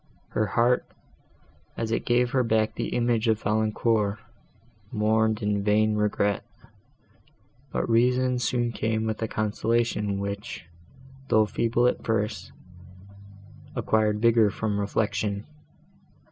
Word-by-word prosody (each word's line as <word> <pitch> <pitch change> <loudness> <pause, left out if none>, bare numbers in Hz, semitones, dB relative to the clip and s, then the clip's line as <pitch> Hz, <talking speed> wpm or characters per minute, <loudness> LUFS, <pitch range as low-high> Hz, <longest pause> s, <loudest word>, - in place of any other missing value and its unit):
Her 110 - 0
heart, 120 +3 +2 0.9
as 115 -1 -2
it 115 - -1
gave 120 0 +2
her 135 -2 +2
back 110 -1 +1
the - - -3
image 120 -1 0
of 110 -1 +1
Valancourt, 110 0 +1 0.7
mourned 110 0 +1
in 105 -1 0
vain 105 +1 +3
regret, 105 -1 0 1.3
but - - -1
reason 125 +2 +2
soon 120 0 0
came 110 -1 -1
with 110 0 -3
a 110 - 0
consolation 110 -1 0
which, 100 -2 -5 0.6
though 110 -4 +4
feeble 115 +3 0
at 125 - +1
first, 105 -3 -2 1.2
acquired 110 -1 +1
vigour 115 -2 +5
from 105 0 -2
reflection. 100 0 -1
110 Hz, 115 wpm, -26 LUFS, 105-115 Hz, 1.3 s, vigour